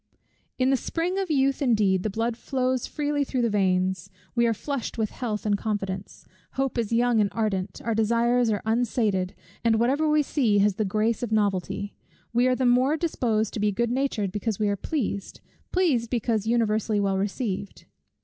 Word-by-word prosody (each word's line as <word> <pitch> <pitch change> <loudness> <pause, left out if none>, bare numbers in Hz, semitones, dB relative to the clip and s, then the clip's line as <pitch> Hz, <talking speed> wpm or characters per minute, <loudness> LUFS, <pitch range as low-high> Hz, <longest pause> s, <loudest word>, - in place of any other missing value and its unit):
In 260 +1 +2
the 270 - +3
spring 345 +8 -2
of 385 -2 -2
youth 275 -2 +2
indeed, 210 -8 +3
the 215 - -1
blood 225 +3 -1
flows 255 0 -1
freely 290 -1 -1
through 260 -2 -1
the 230 - +1
veins; 190 -2 +1 0.2
we 235 -1 +3
are 230 - +2
flushed 275 +1 -4
with 220 -2 -1
health 220 -4 -4
and 205 -1 +2
confidence; 200 -3 -4 0.3
hope 270 -2 -1
is 225 -2 -2
young 235 -1 +3
and 205 - +2
ardent, 200 -4 -2
our 230 - +1
desires 235 +2 +2
are 210 -2 -1
unsated, 220 -5 0 0.3
and 225 -1 +3
whatever 280 +6 +2
we 300 0 +4
see 240 -8 +1
has 200 -1 +3
the 215 - +1
grace 215 +3 0
of 240 -3 -3
novelty; 205 -1 0 0.4
we 245 +2 +3
are 255 - +3
the 255 - 0
more 255 +5 +3
disposed 230 -10 0
to - - -3
be 210 0 +2
good 235 +4 0
natured 245 -7 -1
because 210 +1 -2
we 210 -1 +1
are 200 - +1
pleased; 200 -4 -3 0.3
pleased, 285 -11 +1
because 225 -3 0
universally 220 -2 +1
well 195 -1 +1
received. 200 -1 -3
225 Hz, 185 wpm, -26 LUFS, 205-255 Hz, 0.4 s, we